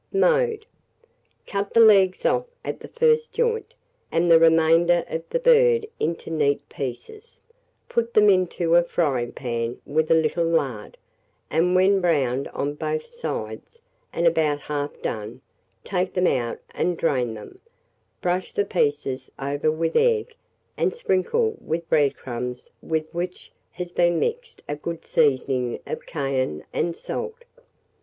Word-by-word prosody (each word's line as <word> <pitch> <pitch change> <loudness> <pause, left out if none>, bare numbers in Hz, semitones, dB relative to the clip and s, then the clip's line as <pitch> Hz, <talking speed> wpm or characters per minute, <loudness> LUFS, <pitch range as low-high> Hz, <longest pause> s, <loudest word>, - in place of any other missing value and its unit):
Mode. 460 +1 +2 0.8
Cut 200 0 -3
the - - +6
legs 195 -4 +5
off - - +2 0.2
at - - -4
the - - -10
first 465 -1 +2
joint, 470 -1 -1 0.4
and 170 +1 +2
the 165 - +8
remainder 165 +1 +4
of 160 - -3
the - - 0
bird 480 -2 +4
into 165 0 -2
neat 145 -3 0
pieces; 420 - -7 0.5
put 235 0 -1
them 210 -1 +6
into 180 -3 +2
a 175 - +7
fryingpan 120 -7 -2
with 155 +2 0
a 165 - +6
little 160 +1 +1
lard, 135 -10 -1 0.5
and 175 +3 +2
when 190 +1 +4
browned 140 -6 +1
on 145 +1 -3
both 465 - -3
sides, 475 -1 -6 0.3
and 170 - -1
about 155 -3 +2
half 145 0 -4
done, 110 +3 -4 0.4
take 185 -1 -2
them 180 0 +2
out 120 -7 0
and 180 -1 -1
drain 125 -7 0
them; 110 - -11 0.6
brush 180 +1 -1
the 415 - +1
pieces 430 - -1
over 145 +3 -1
with 160 +1 -1
egg, 470 -1 +2 0.4
and - - 0
sprinkle 455 0 0
with 165 +1 -3
bread 145 -3 +3
crumbs 125 0 -6
with 160 -1 -1
which 175 +1 -5 0.2
has 180 -1 -7
been 175 -1 +2
mixed 475 0 -3
a 145 - -2
good 165 +2 -6
seasoning 130 -5 +1
of 480 +1 -6
cayenne 130 - -2
and 170 -1 -1
salt. 470 0 -5
170 Hz, 140 wpm, -24 LUFS, -, 0.8 s, the